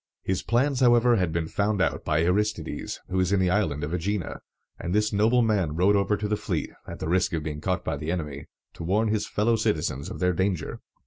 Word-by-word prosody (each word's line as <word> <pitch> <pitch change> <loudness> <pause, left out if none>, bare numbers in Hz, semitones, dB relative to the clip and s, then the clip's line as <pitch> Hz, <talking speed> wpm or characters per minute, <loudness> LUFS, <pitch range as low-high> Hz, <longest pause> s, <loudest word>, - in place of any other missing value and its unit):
His 95 -1 -1
plans, 130 +3 +1
however, 120 -1 +5
had 90 -4 0
been 80 0 -1
found 100 +3 0
out 95 - 0
by 75 +1 +1
Aristides, 90 -4 -1
who 95 - -1
was 95 0 +2
in 100 - +3
the 90 -1 +2
Island 80 -8 0
of 75 - -3
Ægina; 90 +2 -2 0.4
and 90 +2 -2
this 105 0 +2
noble 115 +4 +4
man 95 -9 +1
rowed 95 +5 +4
over 100 +1 +2
to 105 - -2
the 105 - +1
fleet, 100 -6 -3 0.2
at - - -7
the - - -4
risk 90 +1 +1
of 80 -2 -1
being 75 -1 -5
caught - - -1
by - - -1
the 75 +3 -3
enemy, 75 -5 -4 0.3
to - - -8
warn 105 +6 +1
his 105 -1 0
fellow 110 +3 +2
citizens 80 -10 -1
of - - -6
their 90 0 +1
danger. 95 0 -1
95 Hz, 230 wpm, -26 LUFS, 80-105 Hz, 0.4 s, however